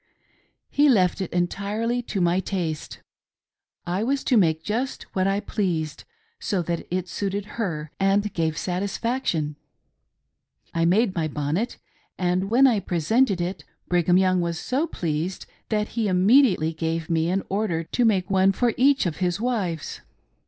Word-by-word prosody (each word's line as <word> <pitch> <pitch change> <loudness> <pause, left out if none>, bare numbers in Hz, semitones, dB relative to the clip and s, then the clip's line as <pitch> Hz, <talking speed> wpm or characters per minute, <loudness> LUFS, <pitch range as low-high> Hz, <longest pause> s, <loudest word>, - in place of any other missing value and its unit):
He 290 +1 +4
left 190 -7 +3
it 190 - -4
entirely 205 +7 -1
to 225 -4 -4
my 175 +1 +2
taste; 175 -5 -4 0.8
I 180 +3 -1
was 270 +3 0
to 250 - +2
make 160 -6 +3
just 240 +7 -2
what 190 0 +1
I 195 +1 +1
pleased, 170 -8 -2 0.3
so 190 -4 -1
that 170 0 -3
it 185 0 -2
suited 200 +1 -3 0.2
her 155 -7 -3
and 200 +1 +2
gave 160 -1 -1
satisfaction. 185 - -2 1.2
I 165 0 +1
made 195 +4 +3
my 165 -3 -1
bonnet; 155 +9 -2 0.4
and 180 +1 0
when 250 +5 +5
I 240 -6 +4
presented 195 - +1
it, 180 +2 -3 0.3
Brigham 175 0 +3
Young 185 -1 +3
was 170 -1 -2
so 270 - -1
pleased 165 - -3 0.2
that 210 -1 0
he 225 -2 -1
immediately 185 - +4
gave 160 0 -2
me 165 -1 +1
an 190 +2 0
order 195 -5 -1
to 245 +9 -1
make 195 -6 +2
one 195 0 +3
for 240 +2 +1
each 270 -1 +4
of 170 -4 -2
his 180 0 0
wives. 205 - -2
185 Hz, 150 wpm, -24 LUFS, 170-215 Hz, 1.2 s, when